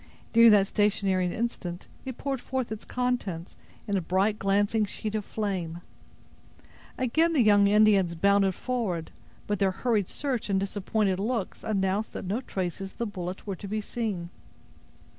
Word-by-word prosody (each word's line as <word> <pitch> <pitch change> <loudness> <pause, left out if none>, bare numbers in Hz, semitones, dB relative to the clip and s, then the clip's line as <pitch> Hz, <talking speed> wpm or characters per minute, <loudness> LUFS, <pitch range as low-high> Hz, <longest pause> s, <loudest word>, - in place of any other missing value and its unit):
During 230 0 +8
that 205 -2 +6
stationary 195 -3 +1
instant, 190 -6 -4 0.2
it 260 -2 -5
poured 270 -3 -3
forth 260 -4 -3
its 220 0 -6
contents, 240 -9 -2 0.3
in 205 - 0
a 190 - +1
bright, 195 +5 +1
glancing 205 +3 +2
sheet 210 +1 -4
of 215 -1 -1
flame. 185 -6 -3 1.2
Again 315 +7 +2
the 275 -6 +4
young 205 -2 +6
Indians 200 -4 +4
bounded 195 +1 +3
forward; 210 -11 -2 0.3
but 205 -2 -1
their 195 - +3
hurried 210 0 0
search 260 -7 -2
and 195 -1 +2
disappointed 195 0 0
looks 220 -1 -2
announced 200 0 0
that - - -5
no 205 +7 -1
traces 190 -3 -4
of - - -27
the 235 - -1
bullet 185 -3 -5
were 200 -2 -3
to 200 - -8
be 215 +2 -2
seen. 205 -6 -3
205 Hz, 160 wpm, -28 LUFS, 190-225 Hz, 1.2 s, During